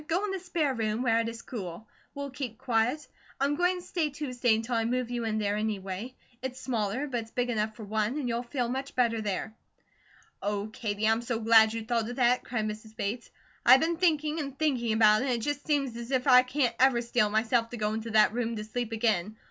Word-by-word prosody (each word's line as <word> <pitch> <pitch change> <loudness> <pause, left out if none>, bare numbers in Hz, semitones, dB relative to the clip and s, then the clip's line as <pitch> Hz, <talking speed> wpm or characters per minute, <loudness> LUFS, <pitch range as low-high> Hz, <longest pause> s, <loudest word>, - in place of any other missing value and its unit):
Go 355 +6 +1
in 410 - -3
the 385 - -3
spare 335 -6 -1
room, 220 0 -1
where 230 -2 +3
it 230 0 -1
is 230 0 -9
cool; 200 -2 -7 0.3
we'll 280 -1 -5
keep 255 -4 -5
quiet. 245 +6 0 0.3
I 275 - +2
am 285 +1 +1
going 360 +2 +1
to - - -15
stay 335 -4 -1
Tuesday 250 -5 0
until 225 +3 -3
I 225 -1 +2
move 245 +1 -1
you 240 -1 -2
in 220 -1 -1
there, 205 -1 0
anyway. 210 +2 -4 0.3
It's 260 0 -5
smaller, 240 0 -1
but 255 -4 -2
it's 225 - -12
big 245 +1 -1
enough 215 -1 -1
for 220 - -9
one, 215 +5 -1
and 280 -4 -2
you'll 235 0 -1
feel 245 0 -2
much 265 +3 -4
better 230 -3 +2
there." 210 +1 -3 0.9
"Oh, 205 +1 -2
Katie, 215 -2 -2
I'm 225 +1 +3
so 235 -1 -2
glad 220 -1 +6
you 225 -1 -4
thought 230 -1 0
of 245 - -5
that," 250 0 +3
cried 230 -3 -2
Mrs. 215 +1 -7
Bates. 225 +2 -3 0.3
"I 255 +2 +9
been 325 +4 0
thinking 310 -3 +1
and 275 -2 -5
thinking 250 -8 +1
about 215 -1 +5
it, - - -1
and 260 - +1
it 235 - -4
just 290 +5 -3
seems 275 -5 0
as 235 0 -7
if 260 -2 0
I 250 -2 +8
can't 255 -1 0
ever 255 -2 +4
steel 235 -2 +1
myself 230 +2 +1
to 240 - -6
go 210 -1 -1
into 220 +1 -4
that 215 -1 +4
room 235 -1 -1
to 210 - -4
sleep 230 +2 -4
again. 215 -2 0
235 Hz, 235 wpm, -29 LUFS, 220-260 Hz, 0.9 s, I